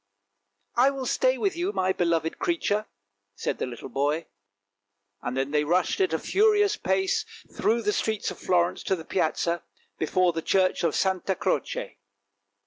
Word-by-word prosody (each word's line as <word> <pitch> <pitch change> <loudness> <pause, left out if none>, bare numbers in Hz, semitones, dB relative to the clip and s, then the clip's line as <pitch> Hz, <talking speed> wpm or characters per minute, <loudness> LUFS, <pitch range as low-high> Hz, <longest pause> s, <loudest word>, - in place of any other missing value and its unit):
" 100 - -53
" 100 0 -47
I - - +6
will 270 -2 -4
stay - - +2
with 395 -2 0
you, 355 +4 -1
my 185 0 +1
beloved 165 -2 0
creature," 215 -11 0 0.5
said - - -3
the - - -1
little 120 -2 -7
boy, 145 +5 0 1.0
and 125 +1 -3
then 135 +1 -1
they 150 0 +2
rushed 175 - +1
at 375 - +2
a - - +1
furious 415 0 +3
pace 385 -2 0 0.3
through 230 +1 +1
the 210 0 +1
streets 220 -2 -1
of - - -10
Florence 175 0 +1
to 190 - +2
the 165 -3 -9
Piazza 170 0 0 0.4
before 180 +2 +2
the 165 - -2
church 185 +1 +2
of 165 -3 +1
Santa 190 0 +1
Croce. - - -2
185 Hz, 170 wpm, -26 LUFS, 160-270 Hz, 1.0 s, I